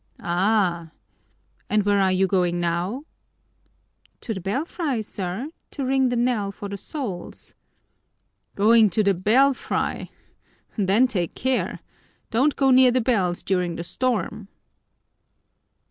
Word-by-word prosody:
"Ah! 175 -2 +1 0.8
And 210 0 +2
where 205 0 +2
are 190 -1 +3
you 185 +1 +2
going 180 -2 +1
now?" 175 - -2 1.2
"To 225 - -3
the 190 - -5
belfry, 270 - -2
sir, 205 - -5 0.2
to 275 - -4
ring 265 0 +2
the 245 - -1
knell 235 -4 0
for 200 - -8
the 200 0 -6
souls." 200 - -7 1.0
"Going 220 +1 +5
to 215 +4 +1
the 200 -1 +3
belfry! 245 +9 +1 0.7
Then 205 +4 +3
take 185 -9 -2
care! 260 0 -1 0.5
Don't 270 +6 +2
go 270 -1 +3
near 255 0 +7
the 250 +1 +2
bells 195 -8 0
during 180 -3 -1
the 170 - -5
storm!" 215 -1 -2
210 Hz, 125 wpm, -23 LUFS, 185-255 Hz, 1.2 s, near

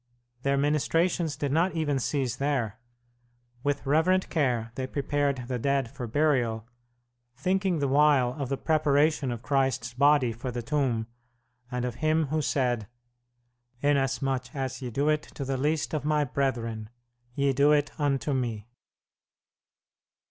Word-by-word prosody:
Their 140 +1 +1
ministrations 155 +3 +1
did 145 -2 -2
not 165 +4 +2
even 145 -4 0
cease 130 -2 -1
there. 130 -5 -1 0.8
With 145 +2 -1
reverent 160 +7 +2
care 125 -7 0
they 130 +1 -4
prepared 140 -2 -1
the 125 -1 -2
dead 135 -1 0
for 130 -3 -6
burial, 120 -5 +1 0.7
thinking 185 +4 +1
the 140 -2 0
while 140 -3 +4
of 135 - -3
the 135 - -1
preparation 150 -2 +2
of 120 0 -6
Christ's 130 -4 0
body 140 -1 +4
for 120 +3 -5
the 120 -1 -4
tomb, 120 -3 0 0.6
and 125 -1 -2
of 120 -1 -4
Him 155 -1 +2
who 155 +1 0
said: 125 -7 0 1.0
"Inasmuch 135 -2 0
as 130 -1 -3
ye 125 - -4
do 140 +6 -1
it 155 0 +2
to 140 - -8
the 135 0 -1
least 150 +5 -1
of 155 - -1
My 150 0 +2
brethren 120 -5 -2 0.5
ye 140 -1 +2
do 140 +3 +4
it 145 -1 +2
unto 145 0 0
Me." 115 -5 -2
140 Hz, 145 wpm, -27 LUFS, 125-150 Hz, 1.0 s, while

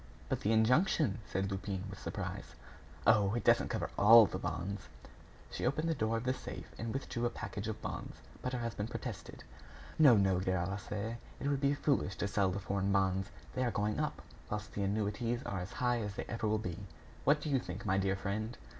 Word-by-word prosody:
"But - - 0
the 105 - +1
injunction?" 120 - +3
said 95 +1 -1
Lupin, 95 0 -3
with 95 0 -8
surprise. - - -5 0.5
"Oh! 105 -1 +5
it 120 - -1
doesn't - - +4
cover - - -2
all 110 +2 +10
the - - -4
bonds." 90 +6 -4 0.6
She - - -4
opened 155 +2 +1
the - - +3
door 115 -5 0
of 115 - -3
the 130 +1 +1
safe - - -8
and 115 0 -3
withdrew 125 -2 -3
a - - -1
package 105 -2 -5
of 110 0 -5
bonds. - - -5 0.3
But 125 - -3
her 125 - -1
husband 115 -2 -3
protested. - - -6 0.6
"No, 140 -8 +8
no, 95 -2 +3
Gervaise, 95 +4 -2 0.2
it - - -2
would 140 -1 +1
be 140 0 +3
foolish 135 -11 +1
to 100 - -1
sell 100 -1 +2
the 95 +2 -2
foreign 100 0 -1
bonds. 95 -1 +2 0.2
They 130 - 0
are 125 - +2
going 105 -1 -1
up, - - -2 0.3
whilst 105 0 -4
the 100 - -2
annuities 105 +5 -1
are 95 - -3
as 90 +2 -6
high 125 -1 +1
as 105 -2 -4
they 120 - -3
ever 115 -1 -2
will 110 +1 +2
be. 90 -5 -4 0.4
What 145 +2 +4
do 150 - -3
you 135 - +3
think, 90 -4 -7
my 95 -1 +2
dear 95 0 +1
friend?" 100 +4 -3
105 Hz, 210 wpm, -34 LUFS, 95-120 Hz, 0.6 s, all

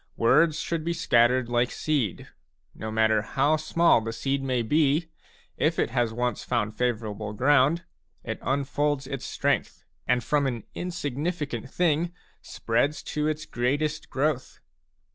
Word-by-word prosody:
Words 150 +7 +4
should 165 -2 -2
be 170 +1 -1
scattered 125 -6 +3
like 120 0 +1
seed; 140 - -1 0.5
no 110 - -6
matter 110 0 +3
how 135 +8 +1
small 160 -3 +3
the 115 0 -4
seed 135 +4 -1
may 130 -3 0
be, 150 +5 +2 0.5
if 160 +2 +1
it - - 0
has 120 -2 +1
once 120 +2 -2
found 110 -3 -1
favourable 110 -4 -2
ground, 145 +7 +3 0.4
it - - -4
unfolds 140 +1 0
its 135 -1 -5
strength - - -1 0.2
and 125 -1 +2
from 145 -2 +1
an 120 -5 -3
insignificant 145 -6 -3
thing 170 +1 +1 0.3
spreads 140 +6 -1
to 150 0 0
its 155 0 -2
greatest 145 +6 -1
growth. 135 -1 -1
135 Hz, 140 wpm, -26 LUFS, 120-155 Hz, 0.5 s, Words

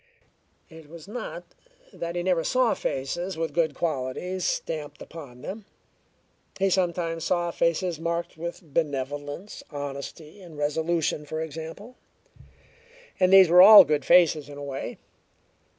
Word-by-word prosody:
It 160 -3 -14
was 170 +2 -12
not 250 - -6 0.5
that 170 +1 -5
he 175 - -2
never 180 -3 +1
saw 255 +2 +2
faces 175 +7 -3
with 165 0 -3
good 165 -2 +1
qualities 165 +5 -3
stamped 150 -2 -3
upon 140 -6 -11
them: 205 +5 -7 0.9
he 195 0 +1
sometimes 170 -3 -1
saw 175 -1 0
faces 170 0 0
marked 170 +1 -3
with 170 +3 -7
benevolence, 145 +4 -3
honesty 145 +5 -7
and 170 -4 -12
resolution, 155 +1 -1
for 155 +2 -5
example, 160 - -7 1.2
and 185 0 +3
these 190 -1 +8
were 180 +1 +8
all 205 +1 +11
good 150 -3 0
faces 160 -4 +4
in 145 - -10
a 145 - -7
way. 135 -1 -6
165 Hz, 135 wpm, -26 LUFS, 150-180 Hz, 1.2 s, all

